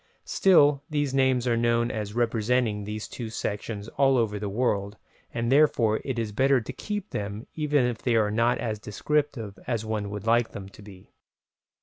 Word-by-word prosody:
Still 145 -7 +4
these 145 -3 -1
names 130 -2 +2
are 120 - +3
known 115 0 +1
as 105 -1 -4
representing 115 -2 +1
these 105 +1 -5
two 115 -3 -6
sections 105 -1 -4
all 135 +2 +2
over 105 -3 0
the 100 -1 -3
world, 100 -2 -1 0.3
and 115 +1 -2
therefore 130 -7 +3
it 135 -3 -3
is 115 -2 -2
better 135 +4 +3
to 125 +3 -7
keep 205 +8 -5
to - - -2
them 100 +2 -6
even 150 -4 +1
if 120 -2 -2
they 120 -2 +1
are 105 -2 +2
not 115 +3 +2
as 110 -3 -3
descriptive 115 -1 -2
as 115 -3 -1
one 105 -2 -2
would 105 0 -6
like 115 +1 +2
them 95 -1 -7
to 100 - -15
be. 100 -3 -14
115 Hz, 190 wpm, -26 LUFS, 105-130 Hz, 0.3 s, Still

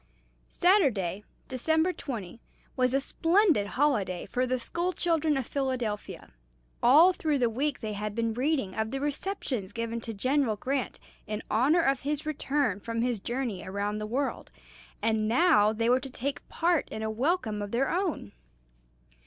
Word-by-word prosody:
Saturday, 240 - +2 0.2
December 320 +7 +1
20, 230 - -6 0.3
was 255 -1 +2
a - - +4
splendid 330 - +2
holiday 215 -11 +1
for 255 +1 -1
the 255 +1 0
school 345 +9 -2
children 320 -4 +1
of 265 - -2
Philadelphia. 255 -7 -3 0.5
All 310 +9 +7
through 310 -4 0
the 240 -3 +1
week 280 +5 -1
they 215 -2 -3
had 210 0 -4
been 230 -1 0
reading 260 -5 0
of 220 +1 -2
the 270 - -3
receptions 285 - -3
given 230 0 -3
to 225 - -6
General 255 +2 +1
Grant 260 +2 -3 0.3
in 210 0 -4
honor 280 +10 +3
of 270 -2 +2
his 295 +1 -3
return 285 -7 0
from 230 +2 -2
his 245 -3 0
journey 240 -3 -3
around 205 +2 -3
the 215 - -4
world, 265 +5 -2 0.5
and 220 -1 +1
now 235 -4 +4
they 230 +1 -1
were 250 +2 +4
to 270 +1 -8
take 265 +2 -5
part 340 -1 +1
in 220 - -5
a 220 - -1
welcome 225 - 0
of 205 - -4
their 245 +5 0
own. 345 - -2
255 Hz, 160 wpm, -28 LUFS, 220-295 Hz, 0.5 s, All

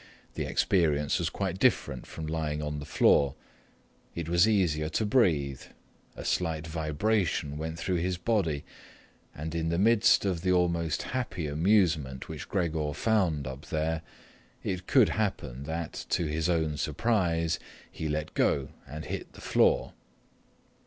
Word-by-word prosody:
The - - -3
experience 75 -6 +2
was - - 0
quite 95 -2 -3
different - - +1
from 80 - -6
lying 80 -1 -2
on 75 -1 -3
the 75 - -7
floor. 70 -2 +4 0.8
It 85 -2 -4
was 85 +4 +4
easier 85 -8 +2
to 110 +7 0
breathe, 80 - +2 0.5
a - - -8
slight 80 -3 0
vibration 80 0 0
went 80 +2 -4
through 90 +2 -1
his 90 +1 -1
body, 90 -7 0 0.7
and 80 +2 -5
in 80 0 -1
the 85 - 0
midst 105 +1 +4
of 90 -4 0
the 95 +1 +1
almost 85 -3 +1
happy 120 -10 -3
amusement 80 -4 +1
which - - -7
Gregor 80 -5 -1
found 90 -11 +1
up 65 +3 -7
there, 80 +1 -1 0.6
it 90 -1 -3
could 130 -6 +5
happen 70 - -2
that, 80 +1 -4
to 85 - +1
his 80 +2 -1
own 80 -3 +1
surprise, 85 -1 +1 0.3
he 80 - -4
let 75 0 -2
go 70 -1 +1 0.2
and 75 +3 -7
hit - - -5
the - - -13
floor. - - +2
80 Hz, 145 wpm, -29 LUFS, 75-90 Hz, 0.8 s, could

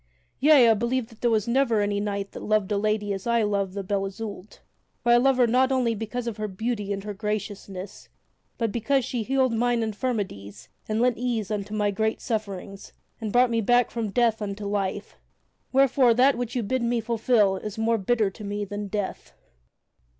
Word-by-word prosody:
Yea; 280 -3 +6
I 225 - +6
believe 235 +2 -1
that 225 -2 -18
there 240 - +3
was 220 -2 +1
never 235 -2 +2
any 205 0 0
knight 200 -1 -3
loved 215 -2 0
a 205 - +2
lady 210 -1 0
as 195 +3 -6
I 235 -1 +3
love 200 -2 -1
the 200 - -2
Lady - - -11
Belle 200 -1 0
Isoult. 205 0 -8 0.4
For 240 - +3
I 240 - +7
love 265 +1 +3
her 250 - +5
not 255 +3 +3
only 250 -3 +2
because 225 +3 -4
of 230 -2 -4
her 215 0 -2
beauty 210 +1 -3
and 200 +1 -4
graciousness, 205 -2 -5 0.5
but 230 -3 -1
because 245 +3 +1
she 245 - -2
healed 260 +1 +1
mine 240 0 +1
infirmities 200 - -4 0.2
and 215 +1 0
lent 245 -1 +2
ease 235 -4 -2
unto 210 0 -3
my 205 -1 +1
great 220 +2 -1
sufferings 200 -4 -5 0.3
and 220 -2 -4
brought 245 +1 +4
me 230 -1 +1
back 245 +2 +3
from 230 -3 -2
death 230 0 +1
unto 205 0 -4
life. 200 0 -3 0.5
Wherefore 265 -2 +4
that 265 +3 +5
which 245 0 -4
you 245 - 0
bid 260 +5 -1
me 235 0 +1
fulfil 225 -3 +2
is 210 +2 -7
more 225 0 +1
bitter 215 0 +1
to 210 - -11
me 205 0 -3
than 205 +1 -5
death." 195 - -4
220 Hz, 195 wpm, -25 LUFS, 205-240 Hz, 0.5 s, I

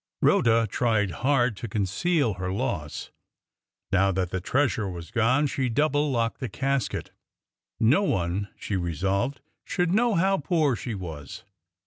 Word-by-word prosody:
Rhoda 115 0 +4
tried 110 -2 +1
hard 120 - +1
to 115 - -5
conceal 110 - 0
her 90 0 -4
loss. 95 - -3 0.8
Now 100 0 +3
that 90 -1 -1
the 95 - -2
treasure 120 -2 +1
was 85 -1 -8
gone, 125 +5 +3
she 130 -2 -1
double 145 +4 +1
locked 115 -3 -1
the 130 - -3
casket. 135 -3 -2 0.7
No 125 - +4
one, 95 - -1
she 105 - -3
resolved, 95 - -1 0.2
should 180 -1 0
know 235 +1 +3
how 190 +3 +2
poor 150 -3 +1
she 115 -1 -5
was. 80 -7 -7
115 Hz, 140 wpm, -26 LUFS, 95-140 Hz, 0.8 s, Rhoda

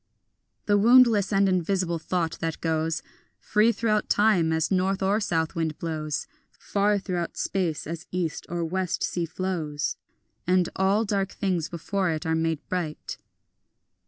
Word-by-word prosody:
The 205 -1 +3
woundless 230 -3 +6
and 195 0 +4
invisible 185 -1 0
thought 165 0 -2
that 165 -1 -3
goes 160 0 -1 0.3
Free 215 +2 +3
throughout 215 -2 0
time 205 -6 +3
as 160 +1 0
north 190 +1 +1
or 200 +3 +2
south 165 -6 0
wind 160 -2 -2
blows, 155 - -3 0.3
Far 205 +1 +1
throughout 180 -3 -3
space 175 -6 -1
as 165 +1 -6
east 175 -3 -3
or 170 -1 -2
west 185 +1 -2
sea 170 -2 -1
flows, 160 -5 -3 0.5
And 180 -1 +3
all 195 +4 +2
dark 200 -2 0
things 180 -5 -1
before 185 +3 -1
it 160 +1 -2
are 160 - +1
made 160 -1 -1
bright. 170 -4 -4
180 Hz, 145 wpm, -26 LUFS, 160-200 Hz, 0.5 s, woundless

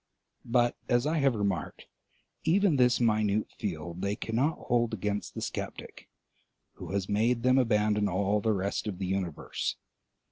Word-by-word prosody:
But, 120 0 +2
as 120 +1 +3
I 155 +1 +1
have 135 -3 +3
remarked, 100 -5 -2 0.6
even 175 -1 +3
this 125 -1 +4
minute 110 -2 +1
field 85 -2 -4
they 100 +1 0
cannot 125 +9 0
hold 120 -2 0
against 105 0 -3
the - - -4
sceptic, - - -6 0.6
who - - -9
has 100 -1 -1
made 115 +3 +1
them 130 +1 +5
abandon 105 -3 +2
all 100 +3 +1
the 110 - +1
rest 100 +1 -1
of 100 -4 -3
the 95 - -3
universe. 90 -4 -2
105 Hz, 150 wpm, -29 LUFS, 100-120 Hz, 0.6 s, them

